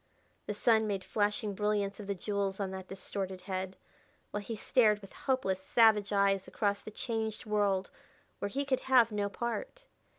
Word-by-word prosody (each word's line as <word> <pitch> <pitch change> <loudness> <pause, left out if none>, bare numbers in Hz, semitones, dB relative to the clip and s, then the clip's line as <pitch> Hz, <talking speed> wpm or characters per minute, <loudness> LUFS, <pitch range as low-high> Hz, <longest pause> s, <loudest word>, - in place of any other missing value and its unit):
The 210 - -2
sun 220 0 +3
made 195 -2 -2
flashing 205 +2 0
brilliance 205 0 0
of 205 - -7
the 200 - -1
jewels 200 +1 -2
on 195 -2 -2
that 190 -1 -7
distorted 190 -1 -5
head, 185 0 -4 0.5
while 205 - -2
he 225 +3 -5
stared 215 -1 +3
with 195 -2 -13
hopeless, 195 -8 0
savage 210 0 +4
eyes 200 -1 +2
across 200 -2 0
the - - -8
changed 220 0 -3
world 205 -3 +1 0.5
where 200 - -2
he 280 +7 -2
could 265 -2 +1
have 250 -4 +4
no 205 -1 -1
part. - - -4
205 Hz, 170 wpm, -32 LUFS, 195-220 Hz, 0.5 s, savage